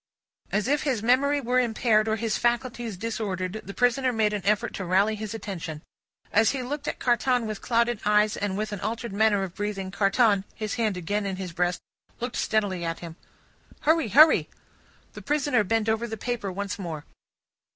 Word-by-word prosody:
As 210 +3 0
if 290 +2 +2
his 255 -7 -1
memory 280 +4 +3
were 250 -1 +1
impaired, 225 -2 +2
or 220 - +1
his 225 -1 -1
faculties 240 -3 -1
disordered, 205 -2 -3
the 200 - -8
prisoner 250 +1 +2
made 220 -3 +1
an 205 - -3
effort 210 +1 +1
to 195 - -4
rally 190 +4 +2
his 215 0 -5
attention. 170 -8 -6 0.5
As 220 +1 +5
he 265 -2 -3
looked 290 +3 -5
at - - -2
Carton 245 0 +1
with 215 -2 -5
clouded 235 -1 +1
eyes 210 0 +3
and 200 -1 -2
with 215 0 -2
an 205 - -4
altered 225 +1 -4
manner 205 -1 +3
of 185 -3 -5
breathing, 200 -2 -4
Carton 200 0 +3
his 215 -1 -4
hand 215 -5 0
again 200 +4 -2
in 190 - -2
his 185 -2 -6
breast 180 +1 0 0.4
looked 245 +1 -4
steadily 200 -5 0
at 165 0 -3
him. 165 -2 -8 0.7
"Hurry, 315 -3 +3
hurry!" 305 +8 +6 0.6
The - - -9
prisoner 290 -6 +1
bent 225 +2 0
over 225 +2 0
the 220 -1 -5
paper, 230 -3 -3
once 200 +3 -4
more. 165 -5 -5
215 Hz, 185 wpm, -26 LUFS, 195-240 Hz, 0.7 s, hurry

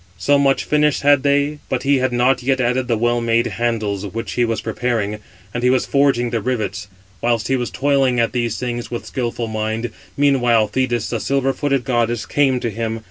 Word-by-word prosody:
So 140 +12 +3
much 135 -1 +2
finish 150 -1 +1
had 145 -1 +4
they, 145 +1 +1
but 130 -1 -1
he 140 -1 +3
had 130 0 0
not 125 +2 +2
yet 130 +1 +1
added 125 0 0
the 115 -2 +1
well 120 +1 +1
made 115 0 +2
handles, 110 -3 -2
which 110 +3 -5
he 120 - +1
was 115 -1 0
preparing; 110 -2 -2 0.3
and 120 - -2
he 125 - +3
was 130 0 +2
forging 135 -4 +2
the 115 -2 -1
rivets. 105 -5 -3 0.3
Whilst 115 -2 0
he 135 - +3
was 125 -2 -2
toiling 135 -2 +1
at 115 - +1
these 120 -3 -1
things 120 -1 -4
with, 120 - -5
skilful 120 -2 -3
mind, 110 +1 -3 0.3
meanwhile 120 -6 +3
Thetis, 120 0 -1
the 115 - -1
silver 135 +4 0
footed 140 -3 0
goddess, 120 -3 0
came 135 -3 +2
to 115 - -2
him. 115 +1 -3
120 Hz, 200 wpm, -19 LUFS, 115-135 Hz, 0.3 s, had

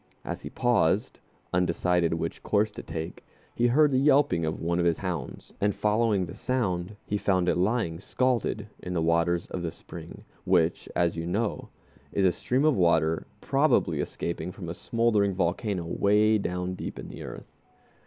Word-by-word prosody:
As - - -4
he - - -7
paused, - - +1 0.3
undecided 90 -1 +2
which 80 0 -4
course 105 +1 +1
to 105 - -8
take, 80 0 -6 0.3
he 120 - +2
heard 145 +4 +4
the 130 - +3
yelping 135 - +3
of 80 - -3
one 85 +2 0
of 85 - +2
his 85 -2 +3
hounds, 90 -3 -5
and 100 0 +2
following 105 -2 +2
the - - -8
sound, 105 -6 -1
he 105 - -1
found 95 -3 +1
it - - +3
lying 90 -3 0
scalded 120 -1 0 0.2
in 90 0 -4
the - - +1
waters 85 +1 +2
of 90 - -3
the 85 - -2
spring, - - -10 0.2
which, 85 -2 +1
as 85 -1 +2
you 85 0 -4
know, 105 +5 -2 0.4
is 100 - +2
a 90 - +5
stream 130 +10 0
of 155 -3 +4
water 80 -3 +2
probably - - +2
escaping 85 +1 -3
from 90 -3 -8
a - - -3
smoldering 105 -1 +1
volcano 90 +1 -1
way 105 +5 +3
down 90 -1 -2
deep - - -6
in - - -7
the - - -9
earth. - - -9
90 Hz, 175 wpm, -27 LUFS, 85-110 Hz, 0.4 s, a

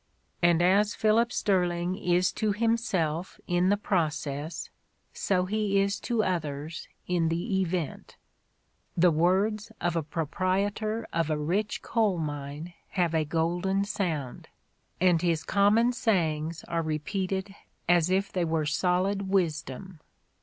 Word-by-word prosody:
And 175 -1 +4
as 200 +3 +3
Philip 225 +2 +3
Sterling 180 -3 0
is 180 -1 +1
to 215 -2 0
himself 195 -7 -1
in 175 +1 +2
the 205 - +3
process, 155 -5 -2 0.4
so 185 -2 0
he 205 0 +1
is 200 0 0
to 235 -3 0
others 155 -3 -3 0.2
in 170 -2 +1
the 190 +4 0
event: 175 -4 -3 0.2
' - - -45
' - - -43
The 175 +1 +5
words 200 +7 +1
of 175 -1 -1
a 165 - +1
proprietor 190 +8 -1
of 165 -1 0
a 155 - +1
rich 185 +8 -1
coal 215 -6 +1
mine 145 +1 -5 0.2
have 175 -2 +2
a 160 -1 +2
golden 175 +5 0
sound, 165 - -3 0.5
and 175 -2 +4
his 170 -3 +1
common 215 +5 +3
sayings 165 -9 0
are 170 -1 -2
repeated 190 +5 -2 0.3
as 175 -1 +4
if 190 +2 +1
they 180 - 0
were 160 -2 0
solid 185 +5 0
wisdom." 165 -2 -1
180 Hz, 135 wpm, -28 LUFS, 160-200 Hz, 0.5 s, The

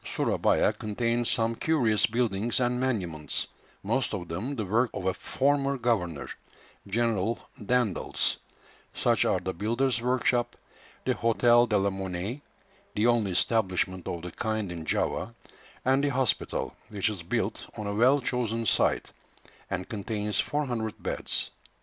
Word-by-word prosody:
Surabaya - - +2
contains 115 +2 -1
some 115 0 +1
curious 115 -6 +2
buildings 115 -1 0
and 125 0 +1
monuments, 90 -12 -1 0.4
most 115 +3 0
of 90 -3 -5
them 110 +12 -3
the 110 -5 -2
work 115 +6 +2
of 95 - -4
a 95 - +2
former 140 +3 +1
governor, 100 - 0 0.6
General 115 0 +1 0.3
Daendels; 120 -3 +1 0.6
such - - +3
are - - +2
the 95 - -3
"Builder's 120 +6 +1
Workshop," 120 -1 +1 0.5
the - - +2
"Hôtel 120 +1 +4
de 105 - +3
la 100 0 +2
Monnaie" 95 +6 -4 0.5
(the 105 - +2
only 120 -4 +3
establishment 95 -3 +1
of 85 -1 -4
the 90 - -5
kind 110 0 -2
in 85 -2 -6
Java), 105 +8 -1 0.5
and 135 +2 +3
the 145 - +3
hospital, 130 -2 0
which 105 -1 0
is 105 -5 -2
built 85 - -2
on 105 - -4
a 100 - -2
well 125 +7 +5
chosen 115 -2 -1
site, - - +2 0.6
and 95 -2 -3
contains 105 -1 -2
400 120 -7 -1
beds. - - -2
115 Hz, 140 wpm, -28 LUFS, 95-120 Hz, 0.6 s, well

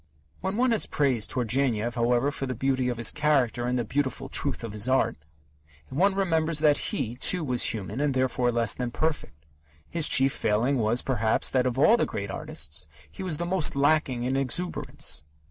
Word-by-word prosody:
When 190 +2 -3
one 255 0 +2
has 225 - +2
praised 130 -7 0
Turgenev, 120 -2 0
however, 120 +3 +1
for 140 -1 -4
the 130 - -3
beauty 130 +1 0
of 120 - -3
his 115 -2 +3
character 135 -5 +1
and 125 0 0
the 120 - 0
beautiful 130 +3 -2
truth - - -1
of 115 -3 -6
his 105 +4 0
art, 130 0 +2 0.7
one 190 +8 +1
remembers 165 -4 0
that 150 -1 +3
he, 120 +2 -3
too, 180 +6 +2
was 125 -4 +2
human 110 +4 -2
and 145 -2 0
therefore 130 -1 +1
less 115 -2 +2
than 125 -1 -3
perfect. 120 - -3 0.4
His 165 -3 +2
chief 135 -2 +4
failing 115 +6 0
was, 115 +2 +1
perhaps, 115 -4 0
that 130 -1 +2
of 125 0 -2
all 215 - +5
the - - 0
great 100 -1 -5
artists, 75 -3 -4 0.2
he - - -10
was 180 -5 -3
the 175 - -3
most 175 -5 -1
lacking 140 -3 +1
in 130 +2 -1
exuberance. 135 - 0
130 Hz, 190 wpm, -26 LUFS, 120-150 Hz, 0.7 s, all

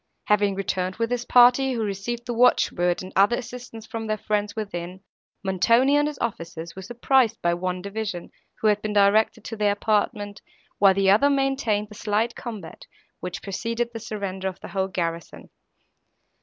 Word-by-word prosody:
Having 205 -1 +2
returned 185 -1 -2
with 230 +1 -2
his 245 0 -1
party, 250 +2 +5
who 230 -2 -1
received 215 +4 -4
the 245 - -3
watch 245 +2 +4
word 175 0 0
and 185 - -10
other 200 +5 +4
assistance 240 -2 -8
from 225 0 -5
their 215 0 -1
friends 210 -1 -2
within, 185 -4 -5 0.4
Montoni 230 +9 +3
and 295 0 +3
his 300 -2 -5
officers 170 -6 -5
were 190 - -7
surprised 240 +3 +1
by 170 0 +3
one 180 +1 -3
division, 200 -3 -5 0.3
who 220 - +2
had 210 0 +1
been 215 -1 -3
directed 205 +2 +3
to 225 - -5
their 210 -1 +2
apartment, 205 -1 -1 0.4
while 195 -2 +6
the 195 0 +4
other 225 +8 +5
maintained 270 -7 0
the - - -11
slight 215 +2 -1
combat, 215 -9 -8 0.3
which 180 -2 -6
preceded 230 +4 -3
the 225 - -5
surrender 200 -4 -4
of 190 -1 -5
the - - -8
whole 190 -1 -1
garrison. 170 -3 -5
210 Hz, 175 wpm, -24 LUFS, 190-235 Hz, 0.4 s, while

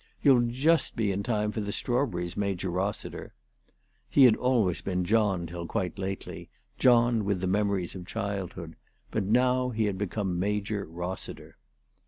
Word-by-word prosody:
You'll 125 -4 +5
just 145 +8 +2
be 105 -3 +1
in 95 +1 -1
time 105 -2 0
for 110 - -3
the 105 0 -3
strawberries, 100 -9 -1
Major 95 -3 -2
Rossiter." 95 +4 -4 0.7
He 140 - +5
had 120 -4 +7
always 115 -9 +1
been 90 -2 -1
John 100 -3 +2
till 85 0 -6
quite 95 -5 -3
lately, 95 0 -5 0.3
John 120 -3 +4
with 100 -2 0
the 95 - -2
memories 100 -1 0
of 90 -2 -8
childhood; 95 -5 -4 0.3
but 110 -3 -1
now 125 +4 +2
he 110 -2 0
had 100 -2 -2
become 95 -2 -2
Major 105 +1 -1
Rossiter. 90 +3 -7
100 Hz, 155 wpm, -28 LUFS, 90-115 Hz, 0.7 s, had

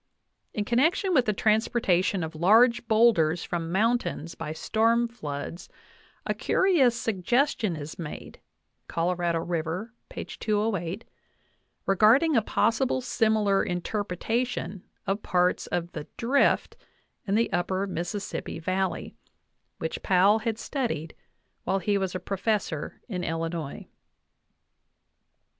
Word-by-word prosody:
In 210 - -1
connection 325 - +2
with 255 -6 +4
the 215 - +2
transportation 205 -4 +1
of 160 0 -5
large 230 +8 +4
boulders 215 -8 +4
from 165 -1 -3
mountains 215 -5 0
uy 155 +1 -6
storm 230 +2 +2
floods, 155 -7 -6 0.6
a - - 0
curious 315 -11 +3
suggestion 225 - +1
is 155 +2 -8
made 160 -3 -7 0.5
(Colorado 170 -1 0
River, 175 +7 -3 0.2
208) 205 -3 -2 0.8
regarding 225 - +4
a 230 - +5
possible 235 +5 +1
similar 220 -5 +2
interpretation 205 +2 -2 0.2
of 195 +2 -1
parts 180 0 +1
of 175 0 -2
the 150 -2 -7
"Drift" 255 +4 +2 0.5
in 195 - +1
the 225 -2 +1
upper 185 +2 0
Mississippi 190 +2 -4
Valley, 185 +3 -2 0.6
which - - -4
Powell 195 +4 +4
had 220 0 -2
studied 230 - -3 0.5
while 190 +2 +1
he 200 +1 +1
was 190 -1 -2
a - - -1
professor 195 -4 -2
in 180 -6 -4
Illinois. 165 -3 -4
200 Hz, 110 wpm, -27 LUFS, 175-230 Hz, 0.8 s, a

